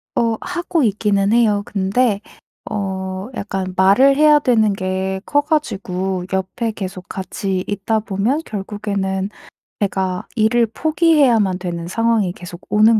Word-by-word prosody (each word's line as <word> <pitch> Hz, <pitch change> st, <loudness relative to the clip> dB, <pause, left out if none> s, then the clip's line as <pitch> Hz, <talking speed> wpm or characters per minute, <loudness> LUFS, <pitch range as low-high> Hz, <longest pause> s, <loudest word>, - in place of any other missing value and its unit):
어. 230 Hz, -1 st, +1 dB
하고 345 Hz, -3 st, -1 dB
있기는 205 Hz, -2 st, +1 dB
해요. 215 Hz, -4 st, +3 dB
근데 205 Hz, +2 st, +1 dB, 0.5 s
어 190 Hz, -1 st, -3 dB
약간 190 Hz, -3 st, -3 dB
말을 200 Hz, +9 st, +5 dB
해야 300 Hz, 0 st, +6 dB
되는 225 Hz, -7 st, +3 dB
게 190 Hz, 0 st, -2 dB
커 290 Hz, -, +2 dB
가지고 190 Hz, -, -2 dB
옆에 190 Hz, +5 st, -1 dB
계속 185 Hz, -3 st, -6 dB
같이 190 Hz, 0 st, -3 dB
있다 205 Hz, +2 st, 0 dB
보면 215 Hz, +7 st, -1 dB
결국에는 200 Hz, -2 st, -3 dB, 0.5 s
제가 190 Hz, -2 st, -1 dB
일을 230 Hz, +1 st, +3 dB
포기해야만 275 Hz, -, +3 dB
되는 170 Hz, -2 st, -4 dB
상황이 225 Hz, -1 st, +1 dB
계속 175 Hz, -1 st, -10 dB
오는 215 Hz, +1 st, +5 dB
205 Hz, 260 characters per minute, -19 LUFS, 190-230 Hz, 0.5 s, 해야